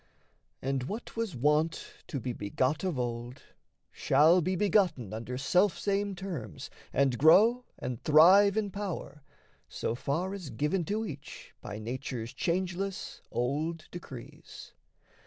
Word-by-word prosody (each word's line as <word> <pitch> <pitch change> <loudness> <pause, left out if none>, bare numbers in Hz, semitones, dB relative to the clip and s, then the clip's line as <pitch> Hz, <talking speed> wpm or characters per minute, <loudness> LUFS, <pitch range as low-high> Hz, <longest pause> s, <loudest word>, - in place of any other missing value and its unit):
And 135 -1 -1
what 215 - -6
was 230 -7 -2
wont 150 +5 +1
to 140 - -3
be 125 0 -3
begot 130 - -1
of 180 -7 -1
old 120 0 -4 0.5
Shall 160 +6 +4
be 185 +3 0
begotten 175 - +1
under 115 +3 -5
selfsame 195 +6 +1
terms 175 - -6 0.2
And 135 -3 +2
grow 225 - +6
and 125 -2 -5
thrive 190 +7 +7
in 205 -2 0
power, 190 -6 -5 0.5
so - - -2
far 160 +10 -2
as 185 -7 -6
given 150 +9 -1
To 215 +6 -1
each 145 -8 -9
by 105 - -6
Nature's 120 +1 -5
changeless, 185 +2 -2
old 150 +7 -2
decrees. 135 -9 -10
155 Hz, 125 wpm, -30 LUFS, 125-190 Hz, 0.5 s, thrive